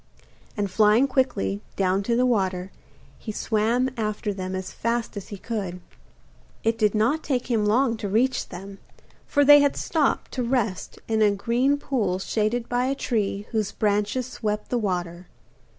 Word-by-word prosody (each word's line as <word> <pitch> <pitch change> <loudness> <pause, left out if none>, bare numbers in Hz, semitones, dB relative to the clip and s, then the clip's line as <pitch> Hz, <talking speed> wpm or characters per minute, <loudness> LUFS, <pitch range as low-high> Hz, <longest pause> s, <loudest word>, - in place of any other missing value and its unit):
And 200 -2 -1
flying 215 +6 +4
quickly 105 - 0
down 190 0 +1
to 235 - +3
the 250 +1 +3
water, 190 -5 0 0.5
he 220 - -5
swam 230 +5 0
after 210 -2 -2
them 185 -1 -4
as 185 0 -5
fast 230 0 -2
as 200 - -6
he 205 - -7
could. 195 -4 -4 0.8
It 225 0 +1
did 210 -1 +2
not 240 +9 +2
take 255 -4 -2
him 215 -3 +2
long 235 +2 +2
to 205 - -4
reach 250 +5 +1
them, 195 +2 -9 0.5
for 285 0 +3
they 290 +1 +9
had 285 -1 +2
stopped 310 -4 0
to 255 - -3
rest 235 -6 -1
in 220 -1 +1
a 210 - +6
green 235 +8 +1
pool 225 -10 -1
shaded 215 +4 -1
by 245 +1 0
a 270 +1 0
tree 205 -6 -1
whose 215 -3 -1
branches 210 +4 0
swept 210 -4 -3
the 245 - 0
water. 180 -4 -3
215 Hz, 165 wpm, -25 LUFS, 200-245 Hz, 0.8 s, they